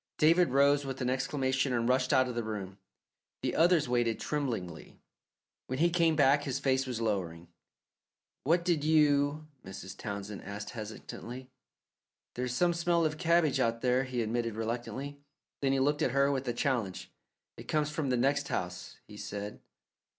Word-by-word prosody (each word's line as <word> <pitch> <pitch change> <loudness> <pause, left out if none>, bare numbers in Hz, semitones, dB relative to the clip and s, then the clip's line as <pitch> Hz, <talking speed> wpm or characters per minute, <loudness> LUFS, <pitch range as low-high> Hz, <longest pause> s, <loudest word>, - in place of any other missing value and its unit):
David 165 +1 +5
rose 140 +2 +4
with 135 -1 -5
an 125 0 +1
exclamation 135 0 0
and 120 -1 +1
rushed 130 0 +2
out 130 0 +4
of 125 - -4
the 120 0 -2
room. 100 -3 -6 0.6
The - - -1
others 170 -3 +4
waited 120 -2 +1
tremblingly. 115 - -4 0.7
When 130 - -3
he 170 +4 +3
came 165 -2 +3
back 145 -1 +4
his 135 -2 -2
face 135 -1 +1
was 125 -3 -3
lowering. 90 -7 -2 0.9
"What 170 +4 +2
did 170 -5 +1
you 150 -1 +3
" 125 - -40
Mrs. 95 0 -8
Townsend 100 -1 -6
asked 100 +1 -6
hesitatingly. 120 +3 -8 0.8
"There's 125 0 -3
some 175 +4 +3
smell 170 0 +1
of 155 0 -2
cabbage 165 -5 +3
out 115 -2 +1
there," 125 +1 +2
he 125 -2 -2
admitted 115 0 -2
reluctantly. 120 +5 -4 0.4
Then 135 -1 +2
he 135 - +2
looked 145 +3 +1
at - - +3
her 140 +1 +3
with 135 -1 -2
a 120 - 0
challenge. 115 -8 -2 0.4
"It - - -11
comes 150 -1 0
from 150 -2 -2
the 125 - +2
next 140 +3 +1
house," 90 0 -4
he 105 - -11
said. 105 0 -6
130 Hz, 170 wpm, -31 LUFS, 115-145 Hz, 0.9 s, David